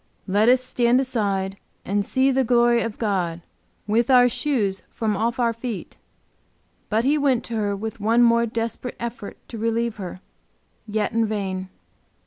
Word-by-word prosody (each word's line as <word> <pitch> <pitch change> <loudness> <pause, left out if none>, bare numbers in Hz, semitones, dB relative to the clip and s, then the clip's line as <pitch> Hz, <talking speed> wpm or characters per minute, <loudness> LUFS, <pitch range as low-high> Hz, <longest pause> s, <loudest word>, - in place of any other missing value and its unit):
"Let 205 +4 +3
us 255 0 +4
stand 245 0 +2
aside 200 -7 -1 0.3
and 200 +1 0
see 260 +5 +2
the 265 0 +2
glory 240 0 +3
of 225 -2 -4
God, 180 -6 -1 0.4
with 225 +4 +1
our 250 -1 +7
shoes 230 -7 0
from 215 -2 -1
off 230 +3 -1
our 235 -2 +1
feet." 230 -5 -6 0.9
But 220 +3 +1
he 295 +2 +3
went 265 -4 +2
to 235 - -6
her 205 -2 0
with 220 +2 -6
one 225 +3 +3
more 235 0 +4
desperate 230 +2 -4
effort 235 -3 -6
to 230 - -7
relieve 230 0 -1
her, 185 -2 -7 0.7
yet 210 0 -1
in 225 0 +1
vain. 190 -3 -3
230 Hz, 160 wpm, -23 LUFS, 205-240 Hz, 0.9 s, our